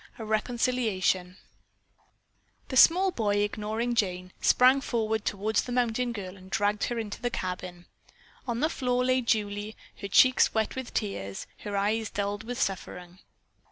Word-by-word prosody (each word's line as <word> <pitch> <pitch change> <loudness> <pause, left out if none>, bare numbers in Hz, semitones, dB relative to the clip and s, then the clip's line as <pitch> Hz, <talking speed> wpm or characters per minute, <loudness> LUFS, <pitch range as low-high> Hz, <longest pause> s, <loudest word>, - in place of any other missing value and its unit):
A 225 - -6
RECONCILIATION 215 -5 0 1.3
The 260 - -4
small 365 +8 +6
boy, 210 - 0
ignoring 215 +3 -2
Jane, 185 -4 -1
sprang 260 +2 +5
toward 220 -4 -1
the 215 +4 -1
mountain 245 0 0
girl 195 -4 -7
and 190 0 -14
dragged 205 +1 +1
her 240 - -3
into 220 -2 -5
the 245 - 0
cabin. 180 -4 -5 0.6
On 240 0 -2
the 310 - +2
floor 250 -3 0
lay 255 0 +2
Julie, 210 -2 -1 0.2
her 200 - -6
cheeks 255 +7 +5
wet 220 -1 0
with 260 -2 -5
tears, 100 - -3
her 205 -1 -4
eyes 215 +2 0
dulled 205 +1 -3
with 245 +1 -5
suffering. 180 -1 -4
215 Hz, 145 wpm, -28 LUFS, 200-245 Hz, 1.3 s, small